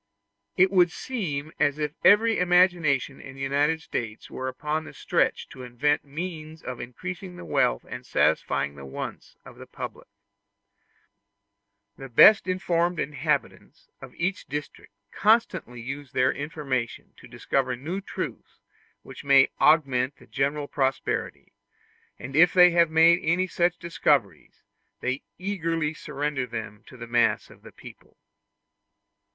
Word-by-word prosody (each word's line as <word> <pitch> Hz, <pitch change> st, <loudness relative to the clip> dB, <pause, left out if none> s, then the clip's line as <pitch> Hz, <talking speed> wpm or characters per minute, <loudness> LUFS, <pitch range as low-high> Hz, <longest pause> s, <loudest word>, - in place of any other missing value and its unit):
It 185 Hz, +1 st, +5 dB
would 180 Hz, -3 st, +4 dB
seem 160 Hz, -, -4 dB
as 145 Hz, 0 st, +2 dB
if 150 Hz, -1 st, -2 dB
every 225 Hz, +3 st, +5 dB
imagination 175 Hz, -7 st, +2 dB
in 135 Hz, -, -11 dB
the 135 Hz, -, -10 dB
United 145 Hz, +4 st, +1 dB
States 110 Hz, -7 st, -5 dB
were 130 Hz, -, -5 dB
upon 150 Hz, +4 st, -3 dB
the -, -, -12 dB
stretch -, -, 0 dB
to 130 Hz, -, -11 dB
invent 125 Hz, +4 st, 0 dB
means 160 Hz, +1 st, -7 dB
of 125 Hz, -1 st, -6 dB
increasing 180 Hz, +9 st, -7 dB
the 180 Hz, -, -10 dB
wealth -, -, +1 dB
and -, -, -7 dB
satisfying 70 Hz, -, 0 dB
the 70 Hz, -1 st, -12 dB
wants 65 Hz, -, -7 dB
of -, -, -13 dB
the -, -, -11 dB
public. -, -, -8 dB, 1.9 s
The 135 Hz, 0 st, -8 dB
best 195 Hz, -, +7 dB
informed 175 Hz, -2 st, 0 dB
inhabitants 140 Hz, -2 st, -3 dB
of -, -, -12 dB
each 185 Hz, +3 st, -2 dB
district 145 Hz, -5 st, -7 dB, 0.2 s
constantly 215 Hz, -, +1 dB
use 135 Hz, +4 st, -7 dB
their 130 Hz, 0 st, +2 dB
information 140 Hz, -5 st, -4 dB
to -, -, -14 dB
discover 130 Hz, -2 st, -1 dB
new 165 Hz, +10 st, -5 dB
truths -, -, -7 dB, 0.4 s
which -, -, -11 dB
may 140 Hz, -1 st, +5 dB
augment 135 Hz, -4 st, +3 dB
the -, -, -18 dB
general 145 Hz, +2 st, -2 dB
prosperity; 135 Hz, -2 st, -2 dB, 0.6 s
and 130 Hz, +2 st, -8 dB
if 175 Hz, +4 st, +5 dB
they 180 Hz, -1 st, +8 dB
have 170 Hz, -1 st, +4 dB
made 165 Hz, +2 st, +5 dB
any 175 Hz, +3 st, +1 dB
such 175 Hz, -1 st, 0 dB
discoveries, 170 Hz, -1 st, -1 dB, 0.4 s
they 130 Hz, +2 st, -2 dB, 0.2 s
eagerly 165 Hz, -5 st, -2 dB
surrender 145 Hz, -3 st, -3 dB
them 110 Hz, -2 st, -7 dB
to 130 Hz, -, -13 dB
the 120 Hz, -, -7 dB
mass 120 Hz, 0 st, +1 dB
of -, -, -18 dB
the -, -, -13 dB
people. -, -, -15 dB
150 Hz, 140 wpm, -26 LUFS, 130-175 Hz, 1.9 s, they